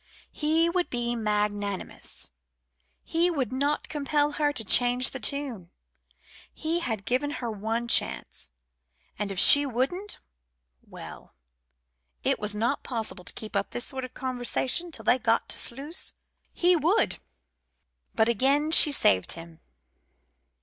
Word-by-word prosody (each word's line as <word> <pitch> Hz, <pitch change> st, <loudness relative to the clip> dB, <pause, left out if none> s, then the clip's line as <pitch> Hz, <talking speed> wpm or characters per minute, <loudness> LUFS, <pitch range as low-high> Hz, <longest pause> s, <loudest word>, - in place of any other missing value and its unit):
He 320 Hz, +2 st, +1 dB
would 355 Hz, +1 st, -1 dB
be 240 Hz, -1 st, -2 dB
magnanimous. 205 Hz, -, -3 dB, 0.7 s
He 340 Hz, +2 st, +1 dB
would 280 Hz, -8 st, -2 dB
not 285 Hz, +3 st, -1 dB
compel 295 Hz, 0 st, 0 dB
her 295 Hz, 0 st, 0 dB
to 260 Hz, -6 st, -4 dB
change 245 Hz, +4 st, +4 dB
the 265 Hz, -, -7 dB
tune. 255 Hz, -12 st, -3 dB, 0.8 s
He 330 Hz, +2 st, -2 dB
had 220 Hz, -, -4 dB
given 260 Hz, +4 st, -1 dB
her 235 Hz, -2 st, -4 dB
one 220 Hz, +3 st, -3 dB
chance; 60 Hz, -, 0 dB, 0.7 s
and 205 Hz, -1 st, -3 dB
if 195 Hz, -, -6 dB
she 285 Hz, +9 st, +9 dB
wouldn't 285 Hz, -, -3 dB, 0.6 s
well, -, -, -12 dB, 0.9 s
it -, -, +1 dB
was 210 Hz, 0 st, -2 dB
not 235 Hz, +6 st, -1 dB
possible 220 Hz, -6 st, -5 dB
to -, -, -4 dB
keep 215 Hz, -1 st, -9 dB
up 200 Hz, 0 st, -1 dB
this 240 Hz, -, -3 dB
sort 265 Hz, -1 st, -2 dB
of 255 Hz, -, -9 dB
conversation 260 Hz, +6 st, -1 dB
till 220 Hz, -8 st, -3 dB
they 250 Hz, -, +3 dB
got 230 Hz, -1 st, 0 dB
to -, -, +2 dB
Sluys. 285 Hz, +8 st, 0 dB, 0.4 s
He 355 Hz, +1 st, +3 dB
would 335 Hz, +7 st, +1 dB, 1.0 s
But 220 Hz, 0 st, +3 dB
again 275 Hz, +6 st, +2 dB
she 315 Hz, -2 st, +8 dB
saved 95 Hz, -, +2 dB
him. 165 Hz, -1 st, -12 dB
255 Hz, 135 wpm, -26 LUFS, 220-295 Hz, 1.0 s, she